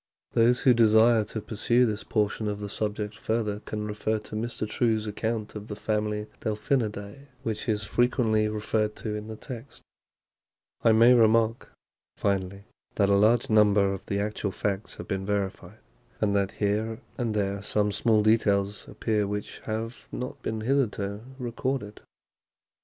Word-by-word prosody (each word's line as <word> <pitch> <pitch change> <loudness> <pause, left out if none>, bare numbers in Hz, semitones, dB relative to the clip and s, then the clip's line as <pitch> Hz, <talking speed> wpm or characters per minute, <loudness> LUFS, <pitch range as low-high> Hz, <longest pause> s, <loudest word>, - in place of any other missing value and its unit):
Those 120 +2 +3
who 130 -3 +6
desire 110 0 +5
to 110 +1 -5
pursue 120 +4 +2
this 110 -2 -2
portion 105 0 0
of 105 0 -2
the 105 -1 -5
subject 105 0 -2
further 110 -2 -1
can 105 0 -5
refer 105 +1 -1
to 105 0 -8
Mr. 110 0 -3
True's 110 -1 +1
account 110 +1 -3
of 105 0 -7
the 105 - -5
family 105 0 -1
Delphinidae, 110 +2 -2 0.2
which 110 0 -3
is 105 -1 0
frequently 110 -2 +2
referred 105 0 -1
to 110 - -4
in 105 0 -5
the 110 - -6
text. 115 +1 -9 1.0
I 115 - +6
may 115 +3 +7
remark, 115 -1 +3 0.5
finally, 100 0 -1 0.3
that 100 -1 +3
a - - +4
large 110 +4 +4
number 105 -2 +4
of 95 - -6
the 100 - -1
actual 105 -1 -2
facts 100 +2 -3
have - - -8
been 95 -2 -2
verified, 100 -1 -3 0.4
and 100 -1 +1
that 100 -1 +2
here 110 +2 -1 0.2
and 115 -3 -1
there 100 -1 -1
some 105 0 +1
small 110 0 +3
details 105 -2 +2
appear 105 -1 -1
which 105 0 -5
have 115 +2 -4
not 125 +1 -5
been 110 -1 -3
hitherto 110 -5 0 0.2
recorded. 120 -3 -3
110 Hz, 155 wpm, -27 LUFS, 105-115 Hz, 1.0 s, may